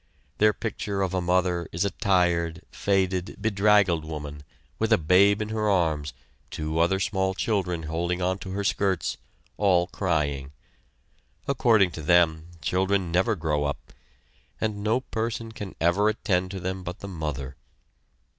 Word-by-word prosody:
Their 105 0 +6
picture 105 -3 -3
of 95 -1 -2
a 95 - 0
mother 90 -1 +1
is 85 +4 0
a 100 - 0
tired, 85 -5 +1
faded, 95 -1 0
bedraggled 100 -5 +3
woman, 75 -2 -6 0.4
with 110 0 0
a 110 - +6
babe 100 +6 +4
in 105 - -7
her 110 -1 0
arms, 80 -6 +1 0.4
two 80 +1 -3
other 90 +3 +3
small 95 -1 0
children 95 -6 -1
holding 85 +3 -1 0.2
to 95 - -8
her 100 +2 -3
skirts, 95 -2 0 0.4
all 90 -4 +3
crying. 75 -7 -2 0.9
According 115 -8 +3
to 80 - -7
them, 80 0 +3 0.2
children 95 +1 +1
never 95 +6 +2
grow 75 -4 -1
up, 70 - -5 0.7
and 105 -2 -2
no 115 +4 +1
person 115 -2 -3
can 105 -3 -8
ever 90 +5 +3
attend 95 -4 0
to 95 0 -5
them 95 +1 -3
but 90 0 -7
the 100 - -6
mother. 75 -7 -5
95 Hz, 145 wpm, -26 LUFS, 85-100 Hz, 0.9 s, Their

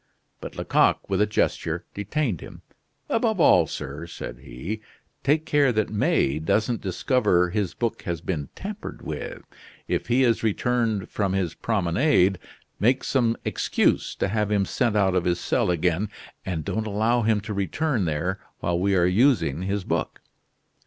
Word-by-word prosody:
But - - -8
Lecoq, - - +2
with 95 +1 +2
a 105 - +4
gesture, 105 - -1
detained 105 - -2
him. - - -11 0.4
"Above - - +1
all, - - +6
sir," 75 +5 -6
said - - -7
he, 85 - -6 0.4
"take 150 +3 +2
care 145 -4 +3
that 110 -2 0
May 75 -8 +1
doesn't 110 +8 0
discover 90 -3 +2
his 100 -2 -1
book 115 -2 -2
has 85 -3 -3
been 80 -5 -3
tampered 205 +1 -7
with. - - -6 0.4
If - - -1
he 125 +2 +3
has 115 -3 +2
returned 115 -2 0
from 100 -3 0
his 90 -4 0
promenade, 95 - +2 0.4
make 125 +5 +3
some 120 -4 +1
excuse - - +1
to - - 0
have 105 0 0
him 100 -2 +2
sent 120 -1 0
out 95 -3 +3
of 90 -2 +1
his 85 -1 +1
cell - - +1
again; 90 +3 +1 0.3
and 85 -5 -3
don't 110 0 -2
allow 110 +4 +1
him 110 -1 +2
to 105 +1 -5
return 105 - 0
there 85 +5 -1 0.2
while 85 0 0
we 100 +1 +2
are 90 -2 +4
using 90 - +3
his 100 +1 -2
book." - - -2
100 Hz, 160 wpm, -25 LUFS, 90-115 Hz, 0.4 s, all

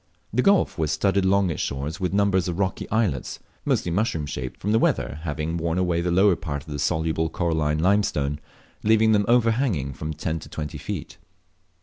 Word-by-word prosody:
This 125 - +3
gulf 195 - +3
was 80 -2 +1
studded 100 -1 +1
along 95 -1 +3
its - - -3
shores 70 +6 -3
with 90 -2 -1
numbers 100 -2 +2
of 85 -1 -3
rocky 95 -1 -2
islets, 105 - 0 0.3
mostly 85 - 0
mushroom 85 -5 0
shaped, 65 -3 -5
from 105 - -1
the 110 - +4
`eater 75 - 0
having 80 +1 -3
worn 85 +1 -1
away 90 -2 +1
the 90 - -1
lower 95 +2 +4
part 70 -4 -5
of 80 - -10
the 75 - -4
soluble 80 +1 0
coralline 80 -3 0
limestone, 80 -6 +1 0.4
leaving 110 +1 +4
them 105 -1 +3
overhanging 115 - +2
from 75 +4 -5
ten 80 +2 -2
to - - -12
twenty 75 -2 -5
feet. - - -6
85 Hz, 190 wpm, -24 LUFS, 75-100 Hz, 0.4 s, the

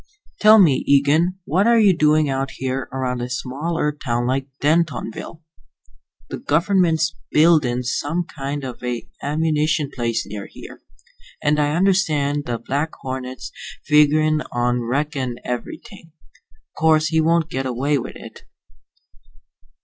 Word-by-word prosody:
Tell 215 +1 +7
me, 165 -10 +4
Eagen, 150 +6 +3
what 185 +8 +2
are 235 0 +5
you 200 -4 +5
doing 155 -1 +3
out 135 0 -2
here 130 0 -3
around 125 -1 -2
a 120 - -4
small 140 +6 -3
Earth 150 -2 -1
town 120 -2 -1
like 135 +2 -1
Dentonville?" 160 -1 -1 0.9
"The - - -5
gov'ment's 165 -1 +1 0.2
buildin' 150 -6 +3
some 145 +7 -2
kind 140 +1 -4
of 125 -2 -7
a 125 -1 -4
ammunition 150 0 0
place 115 -2 -2
near 100 0 -7
here, - - -12 0.6
and 150 +1 +2
I 150 0 +1
understand 155 -6 +1
the 120 -1 -2
Black 145 +6 -2
Hornet's 130 -1 -6 0.3
figurin' 155 0 +3
on 120 0 0
wreckin' 135 0 -2
everything. 165 - -7 0.6
'Course 155 -1 +3
he 160 -1 +2
won't 165 0 +1
get 135 0 -2
away 135 +3 0
with - - -7
it." - - -11
145 Hz, 135 wpm, -21 LUFS, 130-160 Hz, 0.9 s, Tell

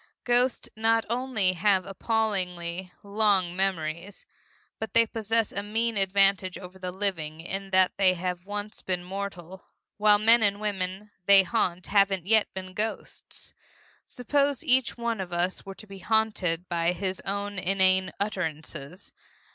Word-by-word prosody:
Ghosts 245 +1 +2
not 225 +1 +2
only 235 -7 +1
have 190 +1 +2
appallingly 185 -4 -1
long 200 -4 +1
memories, 180 -1 -2 0.5
but 220 - -5
they 230 0 +7
possess 225 0 0
a 200 - -3
mean 225 +2 -1
advantage 195 -1 +3
over 185 0 -11
the 185 -1 -4
living 175 -5 -3
in 195 +4 -5
that 185 -1 +4
they 190 -2 +4
have 180 +1 -4
once 205 +1 -5
been 180 -1 -2
mortal, 190 -1 -7 0.3
while 210 0 +5
the 210 - -6
men 230 +1 +7
and 205 -1 +2
women 200 0 -3 0.2
they 200 -1 +8
haunt 185 -4 -1
haven't 195 -3 +2
yet 220 +1 +3
been 185 -1 -7
ghosts. 215 +3 -5 0.5
Suppose 280 +4 -1
each 260 -4 +2
one 235 -3 -2
of 185 -1 -6
us 175 +3 -1
were 195 - -7
to 215 - -11
be 195 -2 -11
haunted 190 -4 0
by 170 0 0
his 185 +1 -3
own 200 0 -4
inane 190 0 +2
utterances? 165 -4 -5
195 Hz, 145 wpm, -27 LUFS, 185-215 Hz, 0.5 s, they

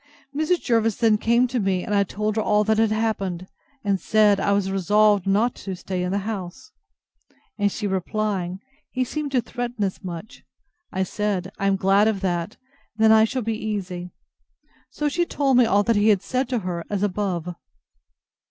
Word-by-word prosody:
Mrs. 315 +4 +1
Jervis 225 -3 +2
then 220 -3 +3
came 235 +3 +3
to 250 0 -2
me, 190 -3 0
and 210 - -3
I 200 -1 +4
told 210 +2 -3
her 220 - +1
all 210 0 +2
that 220 +1 +1
had 225 -1 +3
happened, 200 -5 -1 0.4
and 200 -3 0
said, 210 -2 +4
I 200 - +1
was 200 -1 +1
resolved 205 +1 +3
not 215 +5 +2
to 190 -2 -5
stay 185 0 -4
in 180 0 -2
the 200 - 0
house: 190 -5 -6 0.9
And 205 0 +2
she 210 - -4
replying, 190 -1 -2 0.3
He 255 - -1
seemed 290 +3 -4
to 250 - +3
threaten 240 -2 -4
as 190 -2 -3
much; 180 +3 -8 0.5
I 190 - 0
said, 195 -1 -2
I 195 - +1
am 195 - +3
glad 195 +2 +3
of 210 -3 0
that; 175 -3 -2 0.4
then 220 0 +5
I 220 0 +6
shall 255 +2 -3
be 225 +1 -1
easy. 185 -4 -4 0.8
So 300 - -2
she 345 +4 +1
told 275 -6 +1
me 245 -2 +5
all 205 0 +3
he 215 -1 +2
had 200 -2 +3
said 255 +4 -1
to 250 -2 0
her, 170 -2 -3
as 205 -1 -1
above. 180 -4 -2
205 Hz, 190 wpm, -23 LUFS, 190-225 Hz, 0.9 s, I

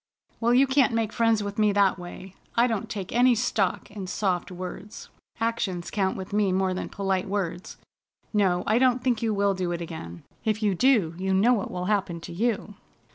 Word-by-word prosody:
Well, 235 +1 +3
you 265 +2 +6
can't 265 -3 +3
make 225 -2 -1
friends 225 -2 +2
with 205 +1 -5
me 210 -1 +4
that 195 -2 +3
way. 180 +1 -9 0.2
I 235 - +5
don't 225 -5 -2
take 195 -4 -5
any 245 +1 +5
stock 215 -5 -1
in 200 -3 -6
soft 185 -2 -1
words. 185 +3 -8 0.3
Actions 220 -6 -2
count 190 -2 0
with 190 +1 -7
me 205 -2 +2
more 190 0 +1
than 185 - -4
polite 195 -1 -1
words. 190 -3 -3 0.6
No, 185 -4 +2
I 220 +3 +3
don't 255 -1 +3
think 245 -3 +1
you 225 -1 +1
will 200 -1 +2
do 185 -2 -2
it 170 - -2
again. 85 - -7 0.2
If 220 -1 -1
you 205 -2 +3
do 210 -6 +3
you 190 0 0
know 225 +6 +4
what 210 -5 -1
will 180 0 -4
happen 195 -4 0
to 165 - -8
you!" 215 +2 -1
200 Hz, 200 wpm, -26 LUFS, 185-225 Hz, 0.6 s, you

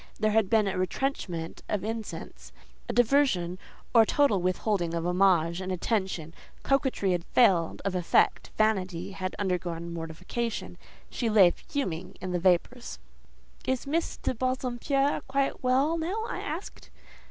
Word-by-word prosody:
There 215 0 +2
had 215 -3 +2
been 220 -2 +3
a 190 -1 -1
retrenchment 185 - -3
of 205 -2 -1
incense, 225 0 -6 0.4
a - - -1
diversion 235 -8 +2 0.3
or 230 - +8
a - - +5
total 275 -10 +3
withholding 180 -1 0
of 165 0 -2
homage 180 -1 +3
and 185 0 -4
attention 185 -4 -2 0.3
coquetry 265 -8 +1
had 175 -1 0
failed 185 -7 +3
of 195 - 0
effect, 180 -2 +2
vanity 190 -4 0
had 185 -1 -4
undergone 175 -3 -2
mortification. 180 +8 -4 0.3
She 235 - -1
lay 200 -5 +6
fuming 185 - -4
in 185 -1 -5
the 180 - 0
vapours. 185 +7 +1 0.7
"Is 260 0 0
Miss 320 +4 -1
de - - -2
Bassompierre 255 +3 0
quite 275 +1 0
well 275 +6 +2
now?" 390 +8 -2
I - - -3
asked. 325 +7 -6
195 Hz, 140 wpm, -28 LUFS, 180-255 Hz, 0.7 s, or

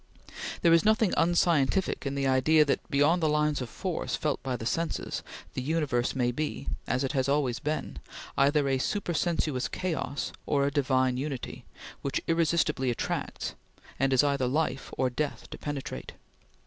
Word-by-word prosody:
There 170 -1 +6
is 165 - +5
nothing 215 -1 +3
unscientific 170 -2 +2
in 135 - -2
the 140 0 0
idea 145 +4 +4
that, 140 - +1
beyond 150 +4 +3
the 155 - +3
lines 150 -1 +1
of 125 - -4
force - - -3
felt - - -1
by 130 -2 -2
the 115 - -6
senses, 165 +6 -2 0.3
the - - -3
universe 135 -4 0
may 125 -2 +2
be 150 +5 -3 0.2
as 130 - +1
it 135 - 0
has 135 -2 0
always 140 -4 +1
been 155 +1 -3 0.4
either 140 +1 +3
a 135 -1 +1
supersensuous 160 -6 0
chaos 165 -5 -3
or 140 -1 +2
a 140 - +1
divine 130 -3 +2
unity, 135 -1 -5 0.4
which 140 - -1
irresistibly 165 -5 +2
attracts, 120 - -3 0.5
and 135 +1 +2
is 130 0 +5
either 140 -3 +1
life 135 -1 -1
or 130 -1 +1
death 145 +3 -3
to - - -7
penetrate. 145 -2 -5
140 Hz, 160 wpm, -29 LUFS, 130-160 Hz, 0.5 s, There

